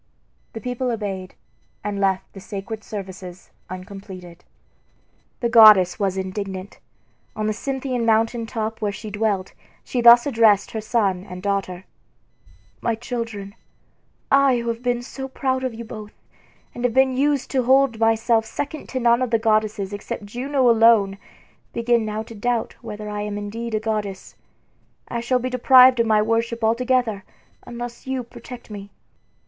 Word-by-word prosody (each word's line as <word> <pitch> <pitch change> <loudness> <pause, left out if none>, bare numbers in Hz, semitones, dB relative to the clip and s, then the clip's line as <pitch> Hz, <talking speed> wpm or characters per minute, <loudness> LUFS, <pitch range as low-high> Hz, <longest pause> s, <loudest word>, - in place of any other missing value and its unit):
The 225 - -7
people 250 0 -2
obeyed, 195 -5 -4 0.5
and 205 -1 -3
left 190 -1 0
the 195 - -10
sacred 205 +3 -7
services 190 -3 -8 0.2
uncompleted. 185 -2 -10 1.0
The 235 - +1
goddess 215 -6 +7
was 195 -2 0
indignant. 190 0 -5 0.6
On 215 - -2
the 215 - 0
Cynthian 260 +1 -3
mountain 225 +1 +1
top 225 -1 -4
where 210 -1 0
she 210 +1 -8
dwelt 205 -3 -1 0.3
she 245 - -2
thus 240 0 +8
addressed 225 -7 +3
her 220 - -4
son 210 -5 0
and 180 0 -8
daughter: 195 -2 -2 1.0
"My 230 - 0
children, 225 -4 -5 0.8
I 275 -2 +5
who 235 0 -3
have 230 0 -3
been 245 -1 -1
so 265 +2 -7
proud 260 0 -2
of 255 -3 -3
you 235 +1 -7
both, 215 -1 -9 0.6
and 240 - -7
have 245 -2 0
been 265 -1 +4
used 280 0 0
to 265 - +2
hold 265 -3 +3
myself 225 0 +3
second 285 +7 -6
to 260 - -2
none 235 0 +3
of 255 - 0
the 230 - +3
goddesses 215 -2 0
except 205 0 -6
Juno 255 +5 0
alone, 225 -4 +5 0.5
begin 235 -1 +1
now 215 +1 -3
to 230 - -12
doubt 235 +2 -1
whether 210 0 -7
I 210 0 -4
am 205 0 -4
indeed 220 +3 -4
a - - +1
goddess. 210 -3 -4 0.7
I 235 - -3
shall 240 +2 +1
be 255 +1 -3
deprived 255 0 +6
of 230 - +3
my 215 -1 +4
worship 230 +1 -1
altogether 230 -2 +1 0.4
unless 240 +1 -7
you 260 -1 -2
protect 240 0 -11
me." 200 -1 -8
225 Hz, 155 wpm, -22 LUFS, 205-245 Hz, 1.0 s, thus